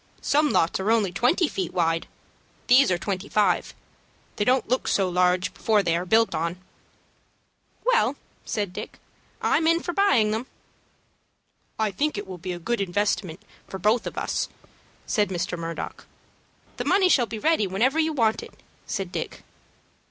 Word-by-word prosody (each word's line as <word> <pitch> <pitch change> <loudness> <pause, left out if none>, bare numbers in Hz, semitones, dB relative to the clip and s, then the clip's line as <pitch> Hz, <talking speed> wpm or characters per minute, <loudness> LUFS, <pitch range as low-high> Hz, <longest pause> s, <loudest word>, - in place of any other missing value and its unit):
Some 300 +1 +3
lots 165 -7 +1
are 190 +3 -1
only 220 -5 +2
twenty 250 - +2
feet 190 - -4
wide. 165 -2 +1 0.6
These 260 +2 +6
are 180 - +2
twenty 190 +2 -4
five. 205 -4 +1 0.6
They 205 - +1
don't 255 +3 +2
look 255 +3 0
so 195 -2 +2
large 180 0 +1
before 215 -2 +2
they 170 -2 +1
are 175 +2 -2
built 225 +4 +3
on." 170 +2 -2 1.3
"Well," - - +3 0.3
said 205 -4 -3
Dick, - - -7 0.5
"I'm 320 - +2
in 335 +1 +4
for 350 - -4
buying 340 - +3
them." 225 +4 -3 1.3
"I 220 -2 0
think 290 +6 -1
it 205 - -4
will 185 -2 -8
be 185 +2 -5
a - - -5
good 220 +6 -2
investment 195 -1 -1 0.2
for 190 - -6
both 215 +5 +1
of - - -7
us," - - -1 0.6
said 210 -4 +1
Mr. 175 -1 -2
Murdock. 165 -1 -6 0.7
"The - - -3
money 385 -1 +4
shall 250 -9 +3
be 225 - -5
ready 260 -4 +2
whenever 240 +11 +1
you 320 0 +2
want 230 -7 +1
it," - - -11 0.3
said 195 -4 -3
Dick. - - -5
210 Hz, 165 wpm, -25 LUFS, 180-250 Hz, 1.3 s, These